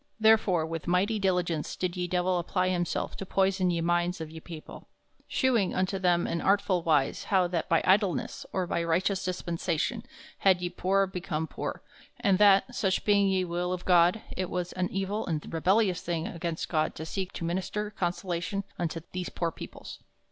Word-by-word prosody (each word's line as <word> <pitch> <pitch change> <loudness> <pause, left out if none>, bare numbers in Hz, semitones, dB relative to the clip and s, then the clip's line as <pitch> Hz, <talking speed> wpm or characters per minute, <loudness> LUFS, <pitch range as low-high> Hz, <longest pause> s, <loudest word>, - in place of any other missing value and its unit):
Therefore 215 -7 +4
with 165 -1 -5
mighty 195 +5 +2
diligence 180 -5 0
did 180 -1 -2
ye 180 -1 -2
Divell 180 0 +1
apply 185 +2 0
himself 175 -2 -1
to - - -4
poyson 190 -1 +1
ye 170 -1 0
minds 175 +1 +1
of 160 -1 -6
ye 160 - -8
people, 160 -1 -10 0.4
shewing 235 -8 +1
unto 185 +1 0
them 175 -2 +2
in 170 - -2
artful 195 -2 +2
wise 150 -5 +1
how 190 -3 +3
that 170 -2 -2
by 165 - +3
idleness 195 -1 +2
or 185 -1 0
by 170 -1 -1
righteous 185 +4 +1
dispensation 180 +3 -2 0.4
had 190 -2 +4
ye 175 0 -3
poore 195 +1 +2
become 180 -4 -3
poore, - - -5 0.4
and 195 -2 +2
that, 205 +4 +5
soche 190 -5 +1
being 200 -1 +4
ye 190 -1 +1
will 175 +1 -2
of 180 -1 -4
God, 180 +3 +4
it 185 -1 -2
was 180 -1 -3
an 180 -1 -1
evill 195 +3 -2
and 160 -3 -3
rebellious 185 +3 +2
thing 165 -2 -2
against 170 -1 -4
God 155 -2 0
to 160 - -6
seeke 190 +3 -3
to 165 - -4
minister 190 +4 -2
consolation 180 +1 -2 0.2
unto 165 -1 -2
these 180 -1 -4
poore 170 -1 -2
peoples. - - -9
180 Hz, 180 wpm, -28 LUFS, 170-195 Hz, 0.4 s, that